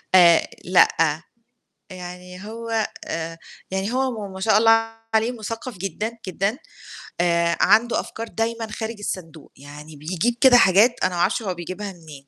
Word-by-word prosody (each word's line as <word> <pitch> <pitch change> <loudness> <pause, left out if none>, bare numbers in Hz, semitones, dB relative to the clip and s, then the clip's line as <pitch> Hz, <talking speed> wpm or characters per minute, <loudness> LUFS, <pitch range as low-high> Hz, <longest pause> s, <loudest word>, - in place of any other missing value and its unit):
آآ 170 -2 +6 0.2
لأ، 165 -3 +3 0.7
يعني 180 +1 -9
هو 225 0 -2 0.2
آآ 165 0 -5 0.3
يعني 190 +3 -2
هو 250 -5 -1
م - - -11
ما 190 - -8
شاء 215 +1 +4
الله 225 +1 +5 0.4
عليه 220 +2 +2
مثقف 230 -1 -6
جدًا، 195 +5 -3 0.2
جدًا، 195 +6 -1 0.6
آآ 170 -1 +2
عنده 235 +2 +4
أفكار 230 +1 -6
دايمًا 225 0 -3
خارج 225 +1 -4
الصندوق، 165 -6 -7
يعني 150 +2 -12
بيجيب 175 +10 -1
كده 260 -2 +8
حاجات 210 +4 +5
أنا 185 -1 +1
ما 170 - 0
أعرفش 205 - +1
هو 195 -4 -2
بيجيبها 185 +4 -6
منين، 155 -5 -14
190 Hz, 150 wpm, -22 LUFS, 170-225 Hz, 0.7 s, كده